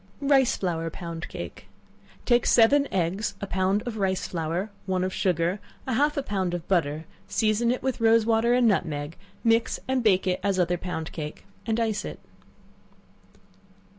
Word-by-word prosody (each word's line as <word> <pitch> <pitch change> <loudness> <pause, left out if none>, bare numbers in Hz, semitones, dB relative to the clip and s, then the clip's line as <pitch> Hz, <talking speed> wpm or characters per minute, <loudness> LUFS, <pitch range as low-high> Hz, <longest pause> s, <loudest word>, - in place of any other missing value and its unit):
Rice 275 -3 +4
Flour 165 -3 -2
Pound 165 0 -6
Cake. - - -8 0.6
Take 240 -1 +3
seven 280 +5 +5
eggs, 190 +3 -1
a - - -4
pound 190 +1 0
of 235 -3 -4
rice 190 -2 0
flour, 175 +4 -3 0.2
one 185 -1 0
of 185 0 -2
sugar, 180 +1 0 0.3
and 260 - -1
half 295 +4 +2
a 280 - 0
pound 190 -6 -1
of 175 -1 -6
butter; 160 -4 0 0.2
season 215 +3 +1
it 250 +1 -1
with 260 -2 -2
rose 225 0 +5
water 230 +1 +2
and 250 -1 +4
nutmeg; 160 -6 -1 0.3
mix 230 0 +2
and 260 -1 +1
bake 195 -5 +3
it 185 -1 0
as 200 -2 0
other 175 -1 +1
pound 160 -3 -4
cake, 150 -2 -7 0.2
and 225 0 +1
ice 220 -2 0
it. - - -7
195 Hz, 165 wpm, -26 LUFS, 175-230 Hz, 0.6 s, seven